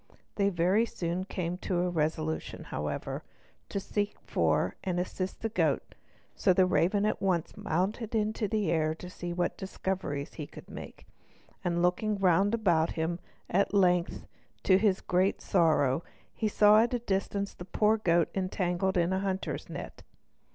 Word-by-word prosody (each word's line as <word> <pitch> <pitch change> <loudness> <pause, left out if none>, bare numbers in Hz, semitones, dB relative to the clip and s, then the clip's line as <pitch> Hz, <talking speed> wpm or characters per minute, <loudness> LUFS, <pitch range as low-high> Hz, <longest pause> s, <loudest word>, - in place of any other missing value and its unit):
They 200 -1 +2
very 190 +5 +2
soon 175 0 -3
came 180 -2 -3
to 180 -2 -1
a 180 - +1
resolution, 160 -1 -2
however, 75 0 -4 0.5
to 200 - -2
seek 205 +1 -2
for - - +1
and 180 -2 -1
assist 185 +1 -3
the 225 - -1
goat, - - 0 0.4
so 185 - +3
the 185 +1 +5
raven 185 +3 +2
at 215 - 0
once 180 -4 0
mounted 205 +7 -1
into 215 0 0
the 215 -1 0
air 155 -1 +1
to 180 +2 -9
see 175 -1 -5
what 175 0 -1
discoveries 190 -6 -3
he 150 -3 -6
could - - -12
make; - - -10 0.6
and 175 0 0
looking 205 +4 +1
round 195 +3 +3
about 170 -7 +2
him, 170 +2 -2 0.3
at 200 +2 +1
length, 180 -3 +2 0.4
to 185 -1 +5
his 195 -3 +2
great 185 +2 +1
sorrow, 160 -6 +2 0.5
saw 210 +1 +6
at 240 +2 +1
a - - +2
distance 200 -2 -2
the - - -9
poor 210 +4 +2
goat 170 -5 +2
entangled 185 0 0
in 175 +1 +2
a 190 - +1
hunter's 190 -1 -3
net. - - -7
185 Hz, 160 wpm, -30 LUFS, 175-200 Hz, 0.6 s, saw